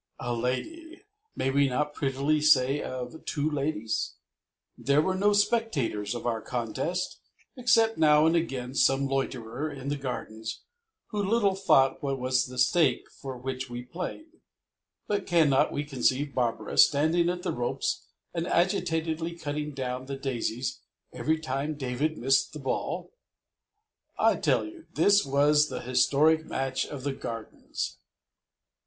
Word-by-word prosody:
A 120 - -2
lady! 320 - -4 0.3
May 135 - 0
we 140 0 +3
not 150 +4 -1
prettily 140 +2 0
say 145 -2 +4
of 130 +4 -6
two 145 0 -1
ladies? 140 -7 -2 0.6
There 140 +1 +2
were 185 +5 +2
no 200 +2 +3
spectators 165 - +1
of 120 - -6
our 115 -2 -1
contest 125 +11 -3 0.4
except 230 - +3
now 150 -1 +6
and 165 +1 +3
again 130 -7 -2
some 135 0 +3
loiterer 135 0 -2
in 140 -1 -6
the 145 - 0
Gardens 115 -4 -5 0.5
who 210 - -2
little 205 -1 +2
thought 160 -9 +3
what 135 -1 -1
was 130 0 +1
the 125 0 -9
stake 130 0 +2
for 135 -2 -6
which 130 +1 -5
we 120 0 -6
played, 310 - -7 0.6
but 205 -1 -2
cannot 155 -7 +4
we 145 - -2
conceive 140 0 0
Barbara 115 -4 -1
standing 160 +4 +5
at 180 0 -3
the - - -1
ropes 120 0 -2 0.3
and 170 +1 -2
agitatedly 165 -2 0
cutting 150 -1 -3
down 130 -1 -4
the 135 0 -4
daisies 125 -2 -3 0.3
every 160 +1 0
time 150 0 -3
David 140 +3 -2
missed 135 +2 +2
the 150 - -7
ball? 135 - -3 1.0
I - - +3
tell - - +1
you, 330 0 -11
this 205 0 +5
was 145 +2 +3
the 130 - -5
historic 140 +6 +3
match 135 -3 -2
of 140 -3 -7
the 140 -1 -1
Gardens. 115 - -6
140 Hz, 145 wpm, -28 LUFS, 130-160 Hz, 1.0 s, now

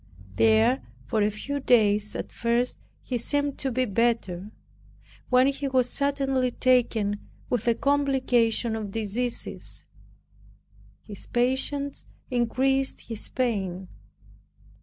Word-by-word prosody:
There 110 +5 +4 0.2
for 210 - 0
a 205 - +3
few 275 +7 -4
days 210 -5 +3
at - - -5
first 235 +1 0 0.2
he 245 -2 -2
seemed 285 +3 -1
to 270 - -1
be 255 +2 +1
better, 210 -4 0 0.8
when 255 0 +5
he 275 +1 0
was 255 -2 +1
suddenly 275 -2 +1
taken 230 -5 +2 0.3
with 240 -1 0
a 235 - +4
complication 255 -5 +1
of 215 -2 -4
diseases. 225 +4 -3 1.2
His 205 -3 -7
patience 265 +3 -1 0.2
increased 265 +3 +1
his 225 -2 -4
pain. 190 -7 -2
240 Hz, 110 wpm, -26 LUFS, 210-265 Hz, 1.2 s, when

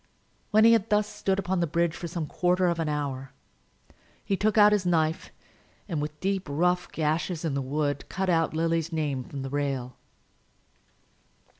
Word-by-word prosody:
When 215 +1 +5
he 230 - +8
had 225 -2 +2
thus 210 0 +3
stood 195 -2 -1
upon 190 -1 -1
the 170 - +1
bridge 170 +1 0
for 170 - -5
some 170 -1 -3
quarter 180 +4 +1
of 170 -1 +1
an 160 -2 -1
hour, 135 -3 -3 0.9
he 195 - +1
took 215 +3 0
out 210 0 +7
his 205 -2 +2
knife, 165 -2 0 0.6
and, 165 -7 -2
with 150 0 -5
deep, 195 -1 -1
rough 180 +4 +1
gashes 160 +2 -1
in 155 - -1
the 140 - -1
wood, 145 +1 -2
cut 190 +1 -2
out 165 -3 +1
Lily's 165 0 0
name 145 -5 -1
from 140 +1 -7
the 135 - -4
rail. 135 -3 -2
165 Hz, 175 wpm, -27 LUFS, 150-185 Hz, 0.9 s, he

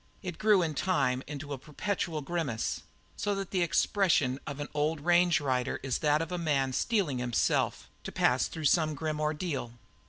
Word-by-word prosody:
It 180 -3 -5
grew 210 -4 +4
in 160 -2 -1
time 140 -6 +1
into 145 0 -6
a 135 - -5
perpetual 160 +1 -3
grimace, 145 -7 -2 0.3
so 205 -1 -1
that 195 -1 -4
the 185 - +1
expression 165 -6 +2
of 140 -1 -5
an 145 - -3
old 150 +1 0
range 175 +1 +4
rider 130 -3 -1
is 135 -2 -1
that 150 0 +2
of 165 - -8
a 180 - -2
man 140 -5 +1
steeling 170 - 0
himself 120 -2 0 0.2
to - - -4
pass - - +2
through 160 -2 -6
some 155 +1 +3
grim 155 0 -3
ordeal. 150 -5 -2
155 Hz, 180 wpm, -30 LUFS, 140-175 Hz, 0.3 s, grew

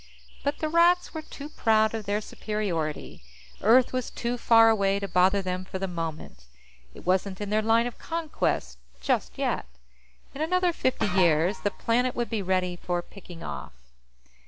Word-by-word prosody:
But 285 - -1
the 310 - -2
Rats 345 +2 +3
were 315 - -4
too 290 -2 -9
proud 220 -6 +2
of 220 -2 -4
their 205 +1 0
superiority. 190 -9 -4 0.4
Earth 245 +5 +5
was 255 -2 -2
too 240 +1 -3
far 230 -1 +6
away 200 -3 +3
to 200 - -4
bother 190 +2 +3
them 185 0 -3
for 190 - -6
the 195 0 -3
moment; 160 - -6 0.5
it - - -12
wasn't 185 +1 0
in 205 -1 -4
their 215 +1 +3
line 225 +2 +3
of 245 - -6
conquest 300 - -2 0.2
just - - -1
yet. - - -1 0.7
In 280 - -6
another 360 +2 +2
fifty 260 -5 0
years, 180 -2 +2
the 205 - 0
planet 245 +4 0
would 240 0 -2
be 220 -2 -1
ready 185 -1 0
for 175 0 -2
picking 175 -4 -12
off. - - -6
210 Hz, 170 wpm, -27 LUFS, 180-245 Hz, 0.7 s, far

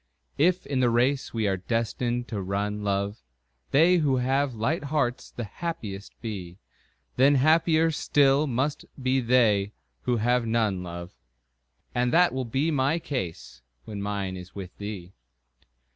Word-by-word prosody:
If 180 +4 +3
in 135 -2 -1
the 125 -1 +4
race 125 +4 +1
we 110 -2 0
are 95 -1 +1
destined 120 +4 -2
to 105 -4 -3
run, 100 +2 -2
love, 100 -1 -1 0.5
They 170 +5 +5
who 145 -5 +2
have 135 +1 +1
light 140 +8 -1
hearts 140 -4 -1
the 120 - -6
happiest 110 - -6
be, 95 -6 -6 0.6
Then 140 +3 +5
happier 160 +3 +4
still 145 -1 +3
must 135 +3 -1 0.2
be 130 +1 +1
they 110 -5 +3 0.3
who 120 - 0
have 120 +1 +1
none, 110 -5 +1
love. 85 0 -7 0.8
And 125 0 +1
that 175 -2 +4
will 130 -1 -2
be 135 +8 0
my 140 +2 +2
case 90 - -5 0.2
when 105 -2 -6
mine 100 -2 -3
is 90 0 -11
with 95 -3 -8
thee. 100 -3 -6
120 Hz, 145 wpm, -26 LUFS, 100-140 Hz, 0.8 s, They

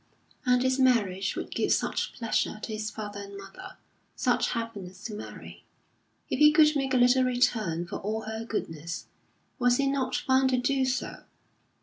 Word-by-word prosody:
And 250 0 +4
his 260 +1 +1
marriage 200 -7 +2
would - - -5
give - - 0
such - - 0
pleasure 230 -3 -1
to 220 - -4
his 215 0 -3
father 205 -1 -6
and 200 0 -9
mother, 285 - -11 0.4
such - - +1
happiness 205 -5 -6
to 220 - -5
Mary. 210 - -9 0.6
If - - -2
he 300 0 +8
could 305 0 +5
make 270 -1 0
a - - +5
little 250 +1 +5
return 220 -9 +1
for 170 - -5
all 215 +2 -3
her 220 +1 -5
goodness, 165 -7 -4 0.5
was 245 0 +4
he 280 - +1
not 275 -2 0
bound 260 0 +4
to 255 - +2
do 265 +2 +1
so? 255 0 -2
240 Hz, 170 wpm, -28 LUFS, 205-260 Hz, 0.6 s, he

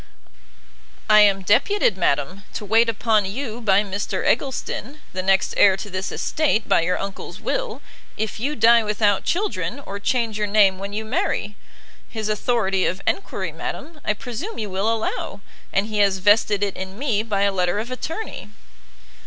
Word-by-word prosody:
"I 215 0 +7
am 200 -2 +5
deputed, 225 - +3
madam, 175 +1 0
to 210 - -5
wait 225 +3 +4
upon 220 -1 +2
you 235 +3 -5
by 200 -1 +4
Mr 200 -1 -3
Eggleston, 270 +2 -1
the 185 - -2
next 190 +1 +2
heir 190 -2 +5
to 205 +1 -7
this 185 +1 -3
estate, 290 -8 0
by - - +4
your 180 +2 0
uncle's 195 0 -6
will, - - -3 0.3
if 220 0 -3
you 285 +6 -1
die 235 -3 +6
without 210 -2 +1
children, 400 -5 -1
or 200 -6 -7
change 225 0 0
your 210 - 0
name 200 -2 +4
when 200 +1 -5
you 215 +2 -4
marry. 210 -2 -1 0.5
His 215 -2 -4
authority 210 -3 +1
of 185 - -2
enquiry, 395 - -2
madam, 315 -2 -7
I 210 - +1
presume 250 - -6
you 210 -3 -4
will 195 +4 0
allow, 220 -2 -3 0.3
and 195 - +1
he 215 -1 -3
has 200 -2 +3
vested 205 +1 +3
it 200 -2 -1
in 190 +1 -7
me 240 -6 0
by 210 -3 -1
a 200 - +3
letter 180 0 0
of 225 +4 -4
attorney." 320 - -5
210 Hz, 170 wpm, -22 LUFS, 195-230 Hz, 0.5 s, I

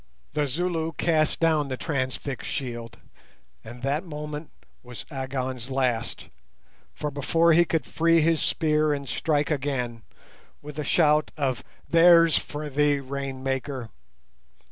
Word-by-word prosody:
The 150 -1 +1
Zulu 165 +2 -1
cast 155 -1 +1
down 160 -3 +2
the 130 -1 -4
transfixed 130 -3 -3
shield, 120 -4 -5 0.7
and 120 +2 -11
that 140 +4 0
moment 150 -2 -6 0.3
was 125 -1 -9
Agon's 130 -2 -4
last, 125 -3 -1 0.7
for 150 -1 -3
before 165 +4 +3
he 170 +2 +5
could 160 -5 -1
free 165 0 +3
his 160 0 +2
spear 155 -1 +2
and 140 -1 -7
strike 150 +1 0
again, 130 -5 -2 0.6
with 150 +1 -9
a - - -1
shout 150 -1 +3
of 135 -4 -1 0.3
"_There's 165 -1 +7
for 150 0 -6
thee, 145 0 +2
Rain 135 -1 -5
maker! 135 -2 -3
145 Hz, 130 wpm, -26 LUFS, 130-155 Hz, 0.7 s, There's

